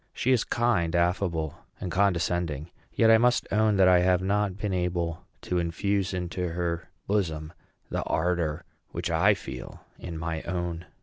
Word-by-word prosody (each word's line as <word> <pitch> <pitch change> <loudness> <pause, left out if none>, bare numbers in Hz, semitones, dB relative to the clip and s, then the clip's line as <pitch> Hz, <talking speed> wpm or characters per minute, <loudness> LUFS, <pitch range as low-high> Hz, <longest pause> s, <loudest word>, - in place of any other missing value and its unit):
She 130 - 0
is 125 -3 +4
kind, 100 -9 +1
affable, 85 -3 0 0.2
and 90 - -4
condescending; 85 -4 0 0.2
yet 115 -1 +4
I 110 - +7
must 125 +1 +3
own 110 0 +3
that 95 -1 +6
I 90 -1 +6
have 90 0 +3
not 100 0 0
been 105 -2 -2
able 90 -1 -2
to 90 - -1
infuse 95 +3 0
into 90 -1 -3
her 85 -1 -2 0.2
bosom 80 -6 -1 0.4
the - - -1
ardor 80 -2 0 0.2
which - - -3
I 95 +6 +4
feel 65 -8 -9
in 85 -2 -6
my 80 0 -3
own. 85 -1 -4
90 Hz, 160 wpm, -27 LUFS, 85-100 Hz, 0.4 s, I